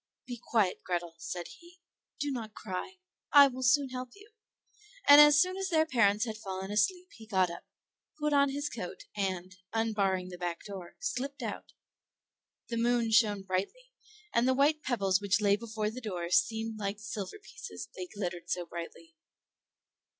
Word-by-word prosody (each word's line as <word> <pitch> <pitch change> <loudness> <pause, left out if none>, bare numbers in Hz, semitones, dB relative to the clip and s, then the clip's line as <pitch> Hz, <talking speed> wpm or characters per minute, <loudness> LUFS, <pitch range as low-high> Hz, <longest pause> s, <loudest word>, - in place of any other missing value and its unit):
"Be 245 -2 -7
quiet, 210 -6 +1
Grethel," 175 -2 -2
said 175 +1 -5
he; 350 +1 -18 0.4
"do 290 0 -1
not 225 -5 -5
cry, 215 - -5 0.3
I 285 -1 +9
will 260 -1 -6
soon 260 +2 +3
help 255 0 -5
you." 415 +2 -17 0.8
And 285 +1 +11
as 295 0 +7
soon 370 +3 +2
as 385 -1 -2
their 320 -3 +3
parents 220 -6 +3
had 220 -2 -5
fallen 190 -1 -5
asleep, 360 - +1
he 220 - -14
got 190 -4 +2
up, 170 - -10 0.5
put 300 0 0
on 280 -1 +4
his 285 +2 -2
coat, - - -6
and, 185 -2 -3 0.2
unbarring 200 -5 0
the 180 -1 -9
back 175 -1 -3
door, 190 -4 -8
slipped 280 - -3
out. - - -6 1.0
The 230 - -2
moon 235 -1 +2
shone 210 -3 +4
brightly, 200 - -3 0.4
and 235 +2 +3
the 260 - +3
white 300 +3 +3
pebbles 200 -8 +1
which 205 0 +2
lay 200 -1 +4
before 215 -1 -3
the 255 +3 -8
door 180 -6 -4
seemed 225 +2 +1
like 200 0 -2
silver 215 - -5
pieces, 425 +3 -9
they 365 - -5
glittered 180 - -5
so 175 -1 -1
brightly. 165 -1 -8
220 Hz, 170 wpm, -31 LUFS, 190-280 Hz, 1.0 s, And